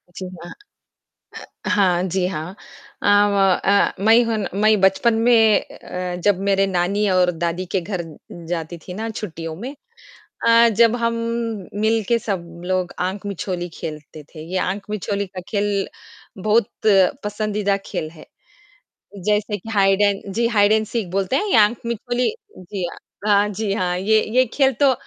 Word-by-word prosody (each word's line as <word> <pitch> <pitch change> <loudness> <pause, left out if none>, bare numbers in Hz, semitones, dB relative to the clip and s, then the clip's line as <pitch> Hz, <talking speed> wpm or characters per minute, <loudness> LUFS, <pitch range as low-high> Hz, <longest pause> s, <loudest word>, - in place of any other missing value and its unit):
जी 190 - -6 0.2
हाँ। 175 - -9 1.1
अ, - - -3
हाँ। 180 -3 +3
जी 185 -1 +1
हाँ। 175 0 -5 0.5
अ, - - -1
व 205 0 +4 0.3
अ, 200 +1 +3
मैं 225 +2 +6
हूँ 230 -1 -1 0.2
मैं 215 -1 +4
बचपन 195 +5 +3
में 225 -2 +4
अ, 180 -1 -6
जब 205 -3 +3
मेरे 195 0 +3
नानी 195 +3 0
और 180 -1 +3
दादी 170 +2 -1
के 190 - +3
घर 180 0 -4 0.5
जाती 170 0 -4
थी 180 - -7
ना 220 +4 -4
छुट्टियों 165 -7 -6
में 250 - -7 0.7
अ, 230 0 +6
जब 235 0 +5
हम 230 -1 0 0.6
मिल 220 +2 +1
के 235 - +3
सब 170 -6 -5
लोग 185 -1 -1
आँख 190 +3 -2
मिछोली 180 -2 -4
खेलते 155 -1 -8
थे, 155 - -8
ये 190 - +1
आँख 195 +2 -2
मिछोली 200 -1 -2
का 185 0 -8
खेल 205 -1 -1 0.5
बहुत 215 +1 +3 0.6
पसंदीदा 210 -1 -1
खेल 155 - -4
है, 160 -1 -14 1.0
जैसे 210 0 +1
कि 215 +3 -11
hide 195 -1 +3
and 200 -1 +1
ji, 230 +3 +1
hide 205 -3 +3
and 220 0 +3
seek 225 +1 -2
सीख 175 - -12
बोलते 195 +5 0
हैं 415 - 0
या 225 - +7
आँख 230 +3 -3
मिछोली 240 +2 -1 0.3
जी, 185 0 -5 0.4
अ, 205 0 +4
जी 210 0 -2
हाँ। 180 -3 -1
ये 215 +4 +3
ये 255 0 +5
खेल 270 -1 +3
तो 275 - +6
200 Hz, 165 wpm, -21 LUFS, 185-220 Hz, 1.1 s, या